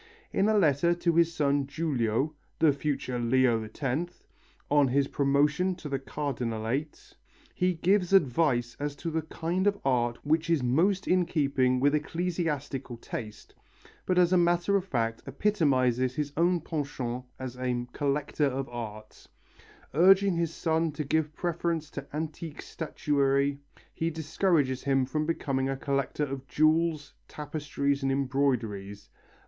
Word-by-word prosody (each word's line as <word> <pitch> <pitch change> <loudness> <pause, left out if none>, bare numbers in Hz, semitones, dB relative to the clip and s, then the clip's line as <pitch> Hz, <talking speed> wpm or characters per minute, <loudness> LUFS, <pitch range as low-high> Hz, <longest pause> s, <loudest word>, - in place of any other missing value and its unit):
In 200 - +2
a 215 - +3
letter 170 -1 +3
to 175 -1 +1
his 170 0 +4
son 145 -4 +1
Giulio, 140 -3 -1 0.2
the 160 -3 +4
future 140 -3 -2
Leo 120 -1 +2
X, 150 +6 -3 0.5
on 145 -1 +5
his 135 +2 +2
promotion 150 +7 +2
to 170 -3 -8
the 135 -1 -1
Cardinalate, 130 0 -3 0.4
he 180 0 +1
gives 180 +2 +2
advice 135 -8 +2
as 145 0 -3
to 165 +4 -5
the 160 0 0
kind 170 +4 -2
of 205 0 +2
art 120 -3 +1
which 160 +2 +1
is 165 -6 +2
most 180 +11 +2
in 180 -1 +3
keeping 135 -4 +1
with 140 +2 +3
ecclesiastical 150 -5 -2
taste, 110 -2 -8 0.5
but 185 - +1
as 180 0 +4
a - - +5
matter 175 +3 +2
of 195 -2 +1
fact 115 -9 -1
epitomizes 130 - +1
his 145 -1 -3
own 175 +1 +2
penchant 140 -6 -4
as 130 -2 -6
a 125 -1 -2
collector 145 +1 0
of 135 0 -3
art. 110 -3 -8 0.7
Urging 190 +4 +5
his 170 -1 0
son 160 -1 0
to 150 - -3
give 155 +1 0
preference 170 -2 -2
to 140 0 -7
antique 155 +1 -5
statuary, 140 -3 0 0.3
he 165 - -1
discourages 155 -4 0
him 135 -1 +2
from 150 +4 -2
becoming 135 -5 -1
a 135 - -2
collector 140 +1 -1
of 135 -1 -6
jewels, 155 0 +1
tapestries 145 -1 -2
and 135 0 0
embroideries. 125 -7 -1
145 Hz, 145 wpm, -28 LUFS, 130-165 Hz, 0.7 s, on